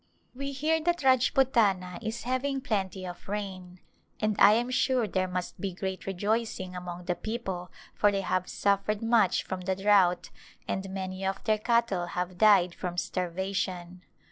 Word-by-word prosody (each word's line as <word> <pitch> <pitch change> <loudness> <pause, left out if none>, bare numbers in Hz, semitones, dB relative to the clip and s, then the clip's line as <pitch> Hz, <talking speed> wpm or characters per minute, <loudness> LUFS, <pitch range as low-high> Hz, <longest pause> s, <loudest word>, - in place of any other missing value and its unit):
We 275 +2 -4
hear 310 +4 +1
that 345 0 0
Rajputana 235 -9 +3
is 220 +1 -4
having 255 +3 -1
plenty 195 -7 -2
of 180 +1 -9
rain, 185 -3 -5 0.4
and 215 -1 +1
I 205 +1 +8
am 240 +3 0
sure 255 -2 +2
there 185 -1 0
must 180 0 -5
be 195 -2 -2
great 190 +1 -5
rejoicing 195 -1 -2
among 180 0 -7
the 180 - +1
people 190 -4 -5 0.2
for 205 - +3
they 195 -1 -1
have 185 -1 -1
suffered 205 +2 0
much 225 -5 +3
from 185 -1 -5
the 190 +1 -1
drought 195 -3 +3 0.4
and 190 0 -3
many 190 0 -5
of 195 0 -2
their 215 -1 +1
cattle 220 -6 +1
have 180 0 -4
died 195 -5 +5
from 175 -1 -5
starvation. 180 0 -3
195 Hz, 160 wpm, -28 LUFS, 180-225 Hz, 0.4 s, I